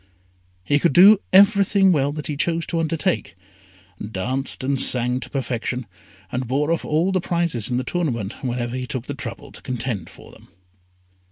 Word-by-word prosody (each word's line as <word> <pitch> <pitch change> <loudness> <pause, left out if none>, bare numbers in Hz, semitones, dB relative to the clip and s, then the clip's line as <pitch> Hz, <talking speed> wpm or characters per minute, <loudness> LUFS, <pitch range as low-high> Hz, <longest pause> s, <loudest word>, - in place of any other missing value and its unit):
He 145 +9 +2
could 170 -2 +2
do 195 +5 +8
everything 200 0 +5
well 145 -4 +1
that 150 -1 -6
he 150 - -3
chose 165 +3 -1
to 170 - -2
undertake 165 +3 -1 0.7
danced 125 +8 -3
and 135 0 +1
sang 125 0 +1
to - - -9
perfection, 125 -2 -3 0.5
and 125 0 -3
bore 145 +5 0
off 165 - 0
all 165 +5 +1
the 185 -1 0
prizes 170 - -1
in 125 - 0
the 130 - -1
tournament 130 - -3
whenever 120 -1 -3
he 130 0 -4
took 130 -4 -4
the 145 - -5
trouble 140 +1 -6
to - - -12
contend 120 -8 -4
for - - -14
them. - - -18
140 Hz, 175 wpm, -22 LUFS, 125-170 Hz, 0.7 s, do